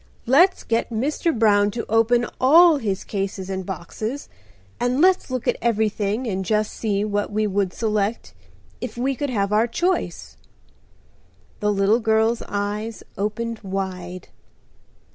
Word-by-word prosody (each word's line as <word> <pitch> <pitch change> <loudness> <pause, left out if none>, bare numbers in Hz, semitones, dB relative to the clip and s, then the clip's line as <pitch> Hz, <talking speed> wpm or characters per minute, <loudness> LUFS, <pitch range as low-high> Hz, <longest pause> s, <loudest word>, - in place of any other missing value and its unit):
"Let's 340 +10 +4
get 230 0 0
Mr. 275 +8 0
Brown 205 -2 +4
to 230 +3 -4
open 230 +2 +3
all 320 +5 +7
his 205 -7 -2
cases 195 -1 -4
and 190 0 -3
boxes, 215 - -5 0.5
and 245 +2 0
let's 370 0 +3
look 255 -2 -3
at - - +2
everything 215 0 0
and 190 -4 -2
just 215 +2 0
see 205 -2 -1
what 205 0 -2
we 215 +1 0
would 200 -2 0
select 215 +1 -2 0.5
if - - -6
we 265 +3 0
could 285 +2 -3
have 200 -4 0
our 220 +3 +3
choice?" 355 +10 -2 1.2
The 210 0 +1
little 200 +3 +3
girl's 220 +1 +2
eyes 205 +2 -3
opened 230 +3 -3
wide. 185 -2 -5
215 Hz, 140 wpm, -22 LUFS, 200-240 Hz, 1.2 s, all